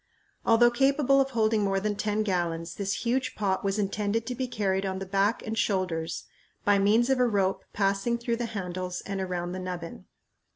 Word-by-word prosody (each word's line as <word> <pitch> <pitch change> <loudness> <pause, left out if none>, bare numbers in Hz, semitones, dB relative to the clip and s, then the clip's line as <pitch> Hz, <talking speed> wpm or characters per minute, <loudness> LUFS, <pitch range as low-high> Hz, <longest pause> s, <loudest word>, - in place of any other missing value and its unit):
Although 240 +1 +6
capable 275 +1 +3
of 270 - 0
holding 220 -3 +2
more 195 -1 +1
than 205 +1 -1
ten 210 +1 0
gallons, 170 -4 -1
this 200 +3 -3
huge 255 +2 0
pot 195 -3 0
was 195 +1 0
intended 210 +2 -1
to 250 - -3
be 255 +1 -3
carried 195 -5 0
on 190 -1 -2
the 195 - -5
back 200 +4 +1
and 220 0 -3
shoulders 175 -6 -1 0.4
by 205 -1 +4
means 220 +6 +3
of 265 - +2
a 250 - +4
rope 195 -3 +1
passing 200 +4 +1
through 235 0 -2
the 240 0 -2
handles 180 -1 -4
and 195 -1 -3
around 175 -2 -3
the 185 - -4
nubbin. 180 -2 -6
200 Hz, 195 wpm, -28 LUFS, 190-230 Hz, 0.4 s, Although